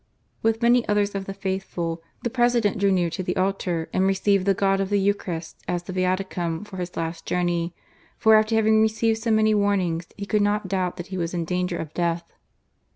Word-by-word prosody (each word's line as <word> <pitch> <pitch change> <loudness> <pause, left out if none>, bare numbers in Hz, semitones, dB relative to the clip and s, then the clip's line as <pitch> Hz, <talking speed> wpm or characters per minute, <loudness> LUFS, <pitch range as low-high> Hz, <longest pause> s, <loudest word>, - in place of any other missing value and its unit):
With 225 +1 +1
many 240 0 +5
others 205 0 +2
of 195 -1 -3
the 195 - -5
faithful, 190 -4 -3 0.2
the 240 - -1
President 240 -4 +2
drew 200 0 +3
near 175 -3 +1
to 185 - -3
the 180 -1 -2
altar, 185 -3 -1
and 190 +1 +2
received 195 0 +2
the 195 - +4
God 195 0 +2
of 195 -1 -1
the 205 - +2
Eucharist, 185 -5 -2
as 175 -1 -1
the 185 - -7
Viaticum 185 -1 -1
for 200 -2 -10
his 180 -1 -5
last 165 0 -4
journey, 175 -1 0 0.4
for 220 - +5
after 215 +1 +4
having 220 0 +4
received 220 0 +1
so 230 - -2
many 215 0 +4
warnings, 190 -5 +1
he 200 - -5
could 210 +1 +1
not 205 -1 +1
doubt 185 -2 -1
that 175 0 -6
he 185 - -2
was 170 +1 -2
in 170 -1 -1
danger 180 +1 -1
of 155 -2 -6
death. 170 -1 0
195 Hz, 210 wpm, -24 LUFS, 175-210 Hz, 0.4 s, many